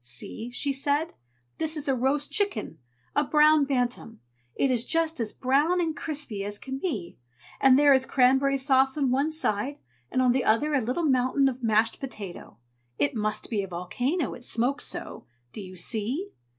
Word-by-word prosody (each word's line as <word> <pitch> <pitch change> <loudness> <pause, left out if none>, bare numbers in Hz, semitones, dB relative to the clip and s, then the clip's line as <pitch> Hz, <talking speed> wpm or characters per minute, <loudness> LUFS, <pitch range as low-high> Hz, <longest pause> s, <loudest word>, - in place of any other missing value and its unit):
"See!" 125 - -7
she 275 +3 -1
said. 285 +3 0 0.5
"This 320 0 -1
is 295 - -2
a 270 - +3
roast 270 +4 0
chicken, 405 - -1 0.4
a 290 - +3
Brown 300 0 +4
Bantam. 245 -4 -2 0.4
It 270 - +1
is 240 -2 +2
just 325 0 0
as 225 -2 -1
brown 290 +7 +1
and 325 -3 -1
crispy 285 -10 -4
as 205 +1 -4
it - - -21
can 265 0 -5
be, 220 - -4 0.4
and 265 -1 +6
there 290 0 +6
is 265 -1 +2
cranberry 270 +2 +3
sauce 265 0 +2
on 275 -4 +1
one 275 +4 +1
side, 280 -3 -1 0.3
and - - -1
on 255 -1 +4
the 260 0 +1
other 290 +8 +2
a 275 - +3
little 255 +9 -1
mountain 260 0 +2
of 260 -1 -3
mashed 225 0 +2
potato; 210 -9 -8 0.4
it 145 - +1
must 215 +1 -3
be 210 -3 +1
a 195 - -5
volcano, 245 - -2
it 245 - -11
smokes 245 +4 -1
so. - - -6 0.3
Do 215 - -6
you 185 -1 -10
see?" 230 - -3
265 Hz, 185 wpm, -26 LUFS, 230-290 Hz, 0.5 s, and